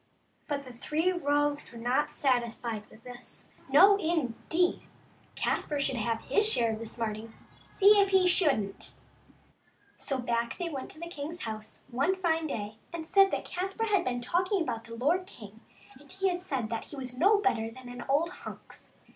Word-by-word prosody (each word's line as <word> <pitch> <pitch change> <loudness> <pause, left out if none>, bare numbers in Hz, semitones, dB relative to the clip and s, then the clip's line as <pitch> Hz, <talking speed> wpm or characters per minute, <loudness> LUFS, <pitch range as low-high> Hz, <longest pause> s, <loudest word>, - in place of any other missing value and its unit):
But 285 -2 -2
the 250 - -10
three 310 +9 0
rogues 290 -4 0
were 235 - -10
not 245 +5 0
satisfied 235 -4 -1
with 220 - -18
this. 250 0 -11 0.2
No, 400 +1 +7
indeed! 330 - 0 0.5
Caspar 295 -1 -1
should 270 -2 0
have 225 0 -1
his 425 +1 +3
share 230 - +2
of 215 - -5
the 230 - -6
smarting, 220 0 -4 0.3
see 410 +1 +6
if 395 -1 +4
he 380 -1 +4
shouldn't! 275 - +1 1.0
So 275 - -3
back 235 -1 -1
they 350 -2 -3
went 275 -5 -5
to - - -9
the 340 - -5
king's 330 +1 -6
house 220 -1 -7
one 275 +10 +1
fine 325 -3 0
day, 215 -5 -5
and 335 -1 -5
said 390 +3 +5
that - - -3
Caspar 385 +5 -3
had 395 -4 +3
been 245 -1 -2
talking 360 - +1
about 230 -9 -3
the 230 0 -8
lord 330 +10 +1
king, 215 - -12 0.4
and 290 - -17
had 375 -1 0
said 270 -11 -3
that 230 - -3
he - - -9
was 255 -2 -6
no 395 +10 +5
better 235 - +1
than 255 +2 -12
an 245 0 -7
old 315 +5 +2
hunks. - - -11
285 Hz, 180 wpm, -30 LUFS, 235-355 Hz, 1.0 s, No